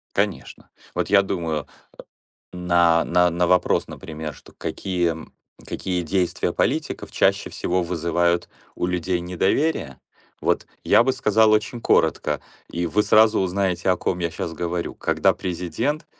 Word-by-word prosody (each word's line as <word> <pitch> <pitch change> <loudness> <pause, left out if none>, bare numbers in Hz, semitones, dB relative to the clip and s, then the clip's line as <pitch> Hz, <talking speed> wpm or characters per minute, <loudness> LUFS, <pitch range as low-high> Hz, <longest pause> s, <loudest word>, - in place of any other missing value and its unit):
Конечно. 100 -2 -2 0.3
Вот - - -1
я 100 -1 +6
думаю, 85 -6 -3 0.9
а, 85 -2 +3
на 90 +1 +3
на 85 +1 0
вопрос, 90 0 +2
например, 80 -1 -7
что: - - -17
какие 90 -3 -1
м, 80 0 -9 0.3
какие 90 -2 -2
действия 90 +2 0
политиков - - -1
чаще - - +2
всего 90 0 -1
вызывают 85 0 0 0.3
у - - -1
людей 90 0 -1
недоверие? 90 - 0 0.4
Вот - - +1 0.2
я 115 - +5
бы 130 - +1
сказал 110 -3 +3
очень 110 +2 0
коротко, - - +1 0.3
и 85 +1 -2
вы 105 +5 +1
сразу 110 +1 +5
узнаете, 95 0 0
о 90 - +3
ком 90 - -2
я 85 -1 -1
щас 80 - -4
говорю. 85 +1 -3
Когда - - +2
президент 105 - -3
90 Hz, 140 wpm, -23 LUFS, 85-100 Hz, 0.9 s, я